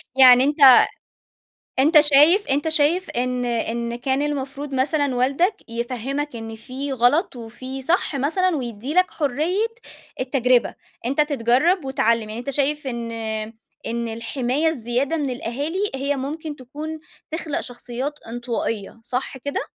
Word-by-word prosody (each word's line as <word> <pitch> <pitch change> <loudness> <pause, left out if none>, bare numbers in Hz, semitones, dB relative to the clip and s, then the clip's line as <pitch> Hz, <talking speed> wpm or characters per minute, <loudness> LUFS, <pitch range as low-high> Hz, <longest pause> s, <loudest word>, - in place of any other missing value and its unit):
يعني 255 -1 +8
أنت 275 -3 +7 1.0
أنت 300 +4 +6
شايف 300 +7 +5
أنت 285 +3 +1
شايف 320 +4 +1
إن 250 0 -1
إن 235 0 -2
كان 265 +3 -1
المفروض 280 -1 -3
مثلًا 275 +1 +1
والدك 280 - +2
يفهّمك 250 +4 -3
إن 225 -1 -7
في 265 +5 -6
غلط 265 - +2
وفي 255 +3 -7
صح 325 0 0
مثلًا، 330 +6 +1
ويدّي 245 +1 -5
لك 365 0 +3
حرية 315 - 0 0.5
التجربة، 255 -1 +2 0.3
أنت 275 +4 +1
تتجرّب 295 +5 +2
وتعلِّم. 230 -4 +2
يعني 215 +2 -6
أنت 245 +3 -4
شايف 285 +1 0
إن 235 -2 -4 0.8
إن 235 0 -2
الحماية 245 +6 -1
الزيادة 260 +1 -1
من 290 -4 -1
الأهالي 285 - -2
هي 280 +2 -1
ممكن 295 +3 -5
تكون 300 +5 -7 0.3
تخلق 315 -2 -3
شخصيات 245 +3 -5
انطوائية، 230 -2 -4
صح 255 +3 -3
كده؟ 285 +2 -3
270 Hz, 130 wpm, -22 LUFS, 245-295 Hz, 1.0 s, يعني